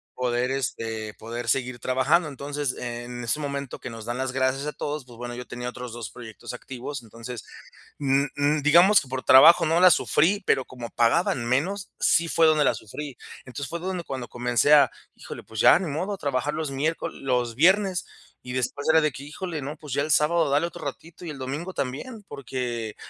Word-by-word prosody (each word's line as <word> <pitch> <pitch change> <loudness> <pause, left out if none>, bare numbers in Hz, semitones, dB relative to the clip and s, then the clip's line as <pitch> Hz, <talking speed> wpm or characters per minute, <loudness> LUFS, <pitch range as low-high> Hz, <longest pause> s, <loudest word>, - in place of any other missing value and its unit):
poder, 125 0 0
este, 115 -5 -3
poder 115 +2 -7
seguir 125 +1 0
trabajando. 130 +7 +2
Entonces, 145 -1 -3
en 120 0 -6
ese 120 +6 0
momento 140 -2 -4
que 125 - -7
nos 115 -1 -9
dan 120 +1 -3
las 130 0 -2
gracias 130 +1 0
a 150 - -2
todos, 150 -2 -4
pues 120 -2 -14
bueno, 120 0 -6
yo 125 0 -7
tenía 125 0 -5
otros 125 -1 -8
2 115 -4 -6
proyectos 110 0 -9
activos. 125 +2 -7
Entonces, 115 +1 -8 0.6
mm 140 0 +2
mm, 145 +1 +1
digamos 175 +8 +6
que 140 - -11
por 130 0 -4
trabajo, 165 +6 +8
no 165 +2 +2
la 185 0 +8
sufrí, 195 +4 +2
pero 130 -2 +2
como 120 -2 -8
pagaban 120 +1 +2
menos, 180 +11 -1
sí 170 0 +3
fue 165 0 +4
donde 155 -1 +4
la - - +3
sufrí. 140 +6 -8 0.3
Entonces, 135 +2 -6
fue 170 - -3
donde 180 -1 -3
cuando 130 -4 -5
comencé 120 +4 +3
a 145 - +6 0.2
híjole, - - -9
pues, 110 -1 -6
ya - - +7
ni 185 - -4
modo, 180 +8 -2
a 200 - -4
trabajar 140 -1 -1
los 155 -1 -3
miércol 150 +4 -2
los 125 -3 0
viernes. 185 - +3 0.4
Y 125 - -7
después 130 +3 -2
era 160 0 +6
de 155 -2 +1
que 135 - -9
híjole, 160 +1 -5
no, 145 +3 -5
pues, 150 -4 -6
ya 140 - +1
el 155 - -4
sábado 155 +1 +3
dale 145 +4 +2
otro 170 - -8
ratito, 160 +5 -8
y 165 - -5
el 145 - -8
domingo 145 +8 -4
también. 185 - -5
Porque 120 -5 -4
135 Hz, 205 wpm, -25 LUFS, 125-155 Hz, 0.6 s, trabajo